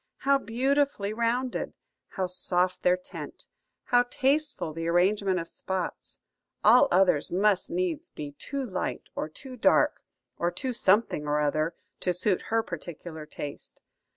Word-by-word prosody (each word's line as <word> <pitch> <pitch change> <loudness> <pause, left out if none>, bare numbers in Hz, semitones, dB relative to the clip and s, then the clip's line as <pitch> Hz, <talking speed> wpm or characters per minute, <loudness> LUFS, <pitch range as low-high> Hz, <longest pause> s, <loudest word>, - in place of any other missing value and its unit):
How 275 +1 +4
beautifully 260 -2 0
rounded! 235 +3 -1 0.3
How 190 - -2
soft 180 0 +1
their 180 0 +4
tint! 180 - -7 0.4
How 245 0 +4
tasteful 280 - 0
the 165 +1 -4
arrangement 185 +2 +2
of 165 - -5
spots! 185 0 -4 0.5
All 235 +4 +7
others 180 -5 +4
must 195 +1 +2
needs 345 -2 -2
be 145 -1 -7
too 280 -1 -3
light 190 -7 -3
or 155 - -3
too 255 - -9
dark, 240 - +3 0.4
or 170 - +2
too 250 +9 -3
something 200 -8 +2
or 150 0 +1
other, 155 +3 0 0.2
to 180 -1 0
suit 185 +1 +1
her 225 0 +2
particular 170 -3 -7
taste. 145 -1 -8
190 Hz, 140 wpm, -28 LUFS, 175-250 Hz, 0.5 s, All